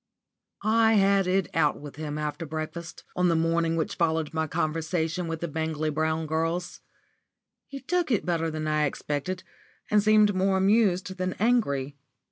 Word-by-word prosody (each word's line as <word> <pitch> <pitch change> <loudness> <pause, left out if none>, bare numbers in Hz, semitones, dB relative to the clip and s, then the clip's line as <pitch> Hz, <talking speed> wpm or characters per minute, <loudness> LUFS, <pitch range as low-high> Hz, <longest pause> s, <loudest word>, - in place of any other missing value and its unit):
*_ - - -59 0.6
I 225 0 +4
had 195 -2 +4
it 190 0 +1
out 150 -2 +2
with 145 -1 -10
him 150 -1 -4
after 150 +1 -3
breakfast, 160 +2 -6
on 180 0 +2
the 165 - +2
morning 165 0 +1
which 160 -2 -1
followed 160 -2 0
my 160 0 -1
conversation 165 +2 -1
with 165 -1 -4
the 170 - -2
Bangley 155 0 -2
Brown 160 +1 0
girls. 165 +3 -2 0.9
He 275 -1 -8
took 350 +4 0
it 225 -6 +1
better 165 -2 0
than 155 0 -4
I 155 0 +2
expected, 150 +6 -3 0.5
and 210 0 +5
seemed 210 0 +5
more 190 +1 +2
amused 190 -2 +2
than 185 0 -1
angry. 145 - 0
165 Hz, 165 wpm, -27 LUFS, 155-190 Hz, 0.9 s, and